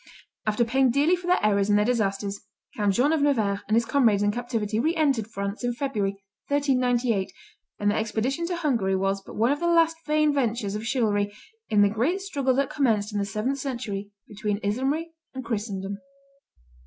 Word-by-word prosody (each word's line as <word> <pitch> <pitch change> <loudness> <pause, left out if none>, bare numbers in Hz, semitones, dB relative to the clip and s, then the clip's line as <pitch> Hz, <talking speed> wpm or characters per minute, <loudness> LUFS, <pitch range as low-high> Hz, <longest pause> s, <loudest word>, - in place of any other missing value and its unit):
After 215 +3 +2
paying 260 +3 +3
dearly 290 +8 +3
for 355 0 -8
their 360 - +4
errors 200 -1 +2
and 205 - +5
their 210 - +3
disasters, 200 -4 -1 0.3
Count 205 -2 +1
John 280 +6 +3
of 315 - +1
Nevers 220 -9 +2
and 215 - +2
his 235 0 +3
comrades 225 -6 +3
in 205 - +3
captivity 225 -2 -2
re 320 +8 +1
entered 275 -9 +1
France 200 +1 -5
in 245 -1 -1
February, 210 -8 -2 0.3
1398, 250 -7 +1 0.5
and 205 0 +1
their - - 0
expedition 240 +9 -1
to 355 - -2
Hungary 240 - 0
was 195 +1 0
but - - -12
one 230 +4 +2
of 290 - 0
the 345 - 0
last 330 -1 +3
vain 305 0 +3
ventures 235 -7 -1
of 215 +2 -4
chivalry 205 -5 +1 0.4
in 205 -1 +4
the - - +5
great 250 - 0
struggle 280 -10 0
that 275 0 0
commenced 220 -7 +1
in 205 - -1
the 200 - 0
seventh 215 +7 -2
century 220 -7 -4 0.2
between 210 0 -2
Islamry 270 +11 -1 0.2
and 260 -2 -5
Christendom. 200 -3 -3
230 Hz, 190 wpm, -25 LUFS, 205-275 Hz, 0.5 s, and